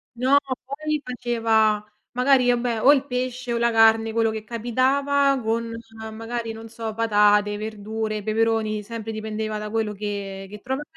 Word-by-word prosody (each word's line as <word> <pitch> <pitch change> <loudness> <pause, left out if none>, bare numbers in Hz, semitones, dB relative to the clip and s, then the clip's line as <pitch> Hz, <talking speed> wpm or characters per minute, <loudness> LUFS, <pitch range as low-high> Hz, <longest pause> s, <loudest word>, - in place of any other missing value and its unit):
No, 260 +4 +4 0.3
poi 300 +2 -3
faceva 225 -4 +1 0.3
magari, 250 0 +3
vabbè, 235 -2 0
o 280 - +7
il 280 -1 0
pesce 250 -1 -3
o - - 0
la 235 0 +2
carne, 225 0 +5
quello 225 0 +1
che 220 -1 -5
capitava, 270 +4 +1
con 230 +1 -1 0.4
magari 225 +1 -4
non 225 0 -9
so, 225 -1 -6
patate, 210 -2 +3
verdure, 215 0 -4
peperoni, 220 -1 0
sempre 225 0 -6
dipendeva 215 0 -4
da 210 0 -5
quello 220 -1 -1
che 200 -1 -5
che 210 0 -9
trova. 265 +3 -3
225 Hz, 155 wpm, -23 LUFS, 215-245 Hz, 0.4 s, o